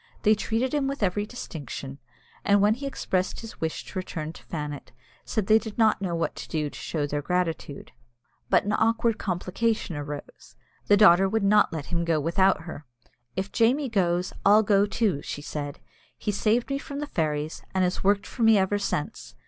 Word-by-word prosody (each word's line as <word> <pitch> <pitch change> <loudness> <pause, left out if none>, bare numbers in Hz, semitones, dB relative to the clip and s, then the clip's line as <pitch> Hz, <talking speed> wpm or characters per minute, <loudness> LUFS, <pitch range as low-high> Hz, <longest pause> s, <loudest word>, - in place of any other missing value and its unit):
They 215 - +6
treated 225 +5 -1
him 285 -2 +1
with 275 -4 -3
every 205 +2 0
distinction, 140 - -7 0.4
and 200 0 +4
when 205 +2 +4
he 275 +4 -5
expressed 185 -8 -2
his 225 -1 -11
wish 160 -1 -3
to 185 - -5
return 160 -4 -5
to - - -14
Fannet, 150 -3 -6 0.3
said 215 -4 -1
they 220 +2 +5
did 220 -2 -8
not 220 -3 +3
know 180 -3 -1
what 165 - -1
to - - -7
do 150 -2 -2
to - - -12
show 150 -3 -2
their 145 0 -2
gratitude. 165 -3 -2 0.6
But - - +4
an 205 - -1
awkward 225 0 +2
complication 190 +1 -1
arose. 145 0 -8 0.3
The 205 - +6
daughter 195 -2 +6
would 220 0 0
not 210 +1 +4
let 160 -3 -4
him 170 0 +1
go 165 -2 +1
without 190 +6 +2
her. 160 -4 -9 0.5
"If 190 +1 -3
Jamie 260 +5 +2
goes, 180 -4 0
I'll 210 +2 +6
go 205 0 +3
too," 205 -9 0
she 145 - -6
said. 145 -2 -5 0.4
"He 210 - -2
saved 225 +5 +1
me 275 - 0
from 280 0 -7
the 295 - -2
fairies, 155 - -2
and 190 - +3
has 180 0 -1
worked 200 +1 +3
for 245 - -8
me 225 -1 +6
ever 195 +1 +1
since. 150 - -3
195 Hz, 195 wpm, -26 LUFS, 160-220 Hz, 0.6 s, They